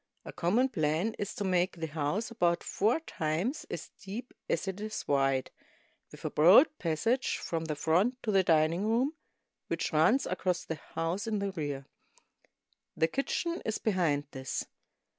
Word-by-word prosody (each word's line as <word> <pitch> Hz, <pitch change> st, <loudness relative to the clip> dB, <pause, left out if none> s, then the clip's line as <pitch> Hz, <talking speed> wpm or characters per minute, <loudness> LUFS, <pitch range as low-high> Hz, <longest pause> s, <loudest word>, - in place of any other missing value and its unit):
A -, -, -7 dB
common 220 Hz, +10 st, +2 dB
plan 165 Hz, -, 0 dB
is 200 Hz, -, -3 dB
to 205 Hz, -, -3 dB
make 185 Hz, -1 st, +1 dB
the 165 Hz, -, -3 dB
house 160 Hz, +9 st, -2 dB
about 175 Hz, -6 st, +1 dB
four 230 Hz, +10 st, +1 dB
times 175 Hz, -, -2 dB
as -, -, -6 dB
deep 215 Hz, +6 st, -7 dB, 0.2 s
as 170 Hz, -, 0 dB
it 190 Hz, +1 st, -4 dB
is 215 Hz, 0 st, -5 dB
wide, 135 Hz, -2 st, +1 dB, 0.6 s
with -, -, -11 dB
a -, -, -1 dB
broad 200 Hz, -, +7 dB
passage 225 Hz, +11 st, 0 dB
from 165 Hz, -1 st, -3 dB
the 155 Hz, -1 st, -2 dB
front 180 Hz, -, +2 dB
to 220 Hz, -, 0 dB
the 195 Hz, -1 st, +5 dB
dining 165 Hz, +1 st, +3 dB
room, 250 Hz, +7 st, +2 dB, 0.5 s
which -, -, -2 dB
runs 220 Hz, -, +4 dB
across 185 Hz, -1 st, -1 dB
the 160 Hz, -2 st, -4 dB, 0.2 s
house 175 Hz, +7 st, -1 dB
in 215 Hz, -1 st, 0 dB
the 200 Hz, 0 st, -1 dB
rear. 145 Hz, -6 st, -4 dB, 1.1 s
The 160 Hz, -, +3 dB
kitchen 335 Hz, +5 st, -1 dB
is 220 Hz, -, -1 dB
behind 170 Hz, -9 st, +1 dB
this. 130 Hz, 0 st, -4 dB
185 Hz, 160 wpm, -31 LUFS, 160-220 Hz, 1.1 s, broad